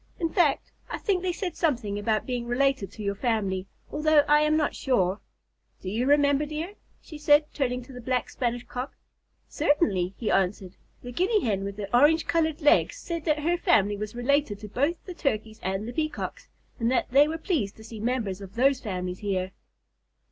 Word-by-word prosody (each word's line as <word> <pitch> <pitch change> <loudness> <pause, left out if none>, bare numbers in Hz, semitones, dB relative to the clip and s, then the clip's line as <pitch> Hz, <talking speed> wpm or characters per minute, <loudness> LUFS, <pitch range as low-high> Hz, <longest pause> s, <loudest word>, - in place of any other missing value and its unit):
"In 335 -2 0
fact, 320 -7 +2 0.2
I - - -3
think 385 -4 0
they 370 -1 0
said 355 -1 -4
something 235 - 0
about 215 +1 0
being 245 -2 -3
related 250 -5 +1
to 215 - -8
your 200 0 0
family, 200 -4 -1 0.2
although 300 0 +4
I 295 0 +5
am 305 +1 +3
not 300 - +1
sure. 195 -7 +1 0.6
Do 185 - -5
you 235 +5 0
remember, 285 0 +4
dear?" 310 +6 -4 0.3
she 305 - -10
said, 295 0 +5
turning 250 -3 -1
to 265 - -13
the 250 - -8
Black 250 +1 -1
Spanish 245 -1 -2
Cock. 250 +2 -6 0.5
"Certainly," 195 - +1
he 230 - -1
answered. 190 -1 0 0.3
"The 245 - -6
Guinea 385 - +2
Hen 200 -4 0
with 200 0 -5
the 200 +2 -2
orange 300 +6 +5
colored 320 -1 0
legs 295 - +4
said 335 -8 -5
that 305 -2 +2
their 340 +4 0
family 210 - +3
was 210 +2 -6
related 250 -2 +1
to 210 - -7
both 285 - -1
the 365 - -7
Turkeys 220 -9 -2
and 195 +3 -2
the 240 - -5
Peacocks, 310 +3 -4 0.3
and 230 0 +1
that 255 - 0
they 280 +3 +6
were 320 +1 -3
pleased 315 - -2
to 220 - -12
see 220 0 -9
members 220 -4 -2
of 195 0 -10
those 265 +2 +3
families 180 -5 -4
here." 190 -2 -2
250 Hz, 195 wpm, -27 LUFS, 205-300 Hz, 0.6 s, they